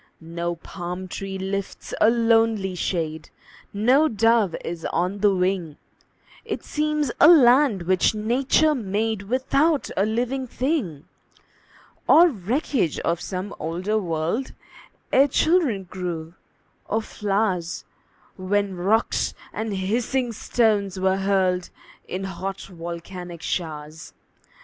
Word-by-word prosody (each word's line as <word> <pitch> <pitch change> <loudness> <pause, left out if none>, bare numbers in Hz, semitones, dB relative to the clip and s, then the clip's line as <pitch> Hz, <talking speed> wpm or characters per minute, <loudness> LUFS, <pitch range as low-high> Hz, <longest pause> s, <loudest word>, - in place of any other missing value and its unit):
No 170 +1 -4
palm 180 +2 -7
tree 195 +1 -5
lifts 195 +1 -5
a 215 - +7
lonely 225 -4 +2
shade, 160 -3 -3 0.4
No 255 +9 +3
dove 225 - +2
is 165 -1 -5
on 180 +4 -1
the 205 +1 +4
wing; 180 -4 -1 0.7
It - - -5
seems 300 -3 -1
a 290 - +8
land 260 - +6
which 185 +4 +2
Nature 255 +8 +2
made 220 -3 -1
Without 270 +7 +1
a 195 - +2
living 245 +5 -1
thing, 245 - -2 1.0
Or 345 +2 +7
wreckage 230 - -1
of 170 0 -1
some 190 +1 -5
older 180 +7 -1
world, 170 +7 -2 0.6
Ere 275 +2 +6
children 290 - +2
grew, 175 -3 -5 0.5
or 220 +1 -1
flowers, 195 -5 -2 0.5
When 200 +1 0
rocks 200 +6 +1 0.2
and 220 0 -3
hissing 235 +6 -1
stones 205 -4 +1
were 190 0 +2
hurled 190 -2 +1 0.4
In 185 +1 -4
hot, 190 +1 -5
volcanic 175 0 -8
showers. 155 -2 -5
195 Hz, 110 wpm, -23 LUFS, 180-235 Hz, 1.0 s, a